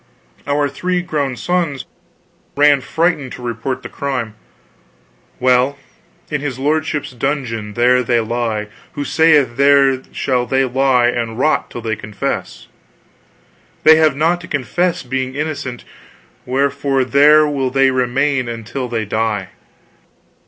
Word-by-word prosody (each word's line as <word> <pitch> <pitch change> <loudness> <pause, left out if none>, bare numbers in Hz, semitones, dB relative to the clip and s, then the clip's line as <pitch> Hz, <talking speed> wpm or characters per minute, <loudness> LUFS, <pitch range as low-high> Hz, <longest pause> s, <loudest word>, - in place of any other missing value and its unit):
Our 145 0 +1
three 180 +4 -2
grown 140 -6 -2
sons 155 -1 -1 0.7
ran 145 -1 +4
frightened 160 -4 -1
to 125 - -9
report 120 +2 -4
the - - -5
crime. 130 -6 -3 1.1
Well, 125 +2 +2 0.5
in 150 -2 -1
his 140 -4 -4
lordship's 150 +1 -1
dungeon 120 -5 -3
there 125 +1 +4
they 120 -1 +1
lie, 110 -2 -2 0.2
who 145 - -4
saith 150 -7 +3
there 140 -1 +4
shall 125 -2 -1
they 135 0 +2
lie 130 -1 +2
and 115 -2 -3
rot 155 +5 +1
till 120 - -7
they 110 -1 -2
confess. 105 -2 -5 1.2
They 160 0 +8
have 155 -3 +3
naught 165 +4 +1
to 170 - -10
confess, 165 +6 -1
being 130 +1 -3
innocent, 145 -5 -4 0.6
wherefore 135 0 0
there 150 +3 +5
will 135 -3 -1
they 135 0 +3
remain 130 +1 0
until 115 +3 -5
they 115 -2 -2
die. 105 -2 -2
135 Hz, 130 wpm, -17 LUFS, 120-145 Hz, 1.2 s, They